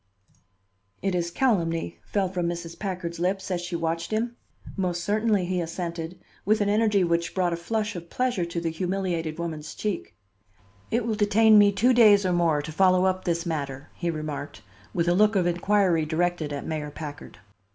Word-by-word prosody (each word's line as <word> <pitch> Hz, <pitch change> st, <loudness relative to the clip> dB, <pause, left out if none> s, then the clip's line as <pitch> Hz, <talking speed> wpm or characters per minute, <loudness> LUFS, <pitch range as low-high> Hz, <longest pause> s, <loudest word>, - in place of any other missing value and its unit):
"It 195 Hz, -1 st, 0 dB
is 170 Hz, -1 st, 0 dB
calumny," 170 Hz, -8 st, 0 dB
fell 200 Hz, -2 st, 0 dB
from 180 Hz, -2 st, -2 dB
Mrs. 170 Hz, -1 st, -5 dB
Packard's 180 Hz, -4 st, -4 dB
lips 190 Hz, +2 st, -1 dB
as 175 Hz, -1 st, -1 dB
she 175 Hz, 0 st, -4 dB
watched 165 Hz, 0 st, -2 dB
him. 230 Hz, +2 st, -1 dB, 0.4 s
"Most 180 Hz, -3 st, -1 dB
certainly," 210 Hz, -2 st, +1 dB
he 180 Hz, 0 st, -1 dB
assented, 170 Hz, 0 st, -5 dB, 0.3 s
with 215 Hz, +3 st, +2 dB
an 205 Hz, -1 st, +1 dB
energy 210 Hz, -2 st, +3 dB
which 170 Hz, -1 st, 0 dB
brought 180 Hz, -2 st, +1 dB
a -, -, 0 dB
flush 210 Hz, +5 st, -2 dB
of 170 Hz, -1 st, -8 dB
pleasure 250 Hz, -7 st, 0 dB
to 170 Hz, 0 st, -3 dB
the 165 Hz, -1 st, -2 dB
humiliated 175 Hz, -2 st, -2 dB
woman's 160 Hz, -3 st, -5 dB
cheek. 210 Hz, -4 st, -4 dB, 0.7 s
"It 235 Hz, 0 st, 0 dB
will 230 Hz, -, 0 dB
detain 215 Hz, +1 st, +5 dB
me 205 Hz, 0 st, +6 dB
two 225 Hz, +6 st, +3 dB
days 210 Hz, -4 st, +6 dB
or 180 Hz, -, +2 dB
more 165 Hz, -4 st, +2 dB
to 160 Hz, -, -6 dB
follow 185 Hz, +2 st, +4 dB
up 185 Hz, 0 st, 0 dB
this 170 Hz, 0 st, 0 dB
matter," 140 Hz, -4 st, -4 dB
he 175 Hz, -, -3 dB
remarked, 150 Hz, -7 st, -5 dB, 0.3 s
with 170 Hz, +6 st, 0 dB
a 175 Hz, -, +4 dB
look 210 Hz, +3 st, +4 dB
of 185 Hz, -3 st, +3 dB
inquiry 175 Hz, -2 st, +2 dB
directed 170 Hz, -1 st, 0 dB
at 140 Hz, -1 st, -4 dB
Mayor 155 Hz, -2 st, -3 dB
Packard. 145 Hz, -1 st, -8 dB
175 Hz, 185 wpm, -26 LUFS, 165-200 Hz, 0.7 s, me